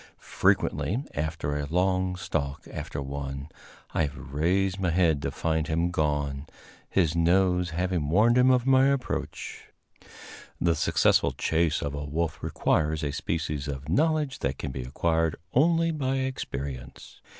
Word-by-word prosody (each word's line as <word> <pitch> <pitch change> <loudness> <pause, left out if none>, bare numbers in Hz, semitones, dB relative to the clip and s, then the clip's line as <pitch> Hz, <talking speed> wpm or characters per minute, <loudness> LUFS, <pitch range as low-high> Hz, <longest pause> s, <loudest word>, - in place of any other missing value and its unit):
Frequently, 120 +9 +1
after 75 -1 -2
a 75 -1 -2
long 90 +2 +1
stalk 80 -5 -3
after 70 - -5
one, 70 +1 -5 0.4
have 75 -3 0
I - - -9
raised 90 +8 0
my 90 -2 +1
head 80 -4 +2
to - - -1
find 80 -1 -1
him 85 +2 0
gone, 75 -3 -1 0.4
his 85 -4 +2
nose 90 +1 +3
having 85 -2 -1
warned 110 +8 +4
him 125 +1 +5
of 125 -1 +3
my 135 0 +5
approach. 140 -2 -3 0.9
The 85 -1 +3
successful 75 - +3
chase 80 0 +1
of 70 - -2
the 70 +1 -4
wolf 80 +2 -2
requires 80 0 0
a 70 - -1
species 75 -1 -3
of 70 0 -5
knowledge 150 - +1
that 70 0 -2
can 70 - -4
be 65 - -5
acquired 80 +5 0 0.2
only 165 +4 +3
by 135 -4 -1
experience. 70 - -5
80 Hz, 145 wpm, -27 LUFS, 75-95 Hz, 0.9 s, him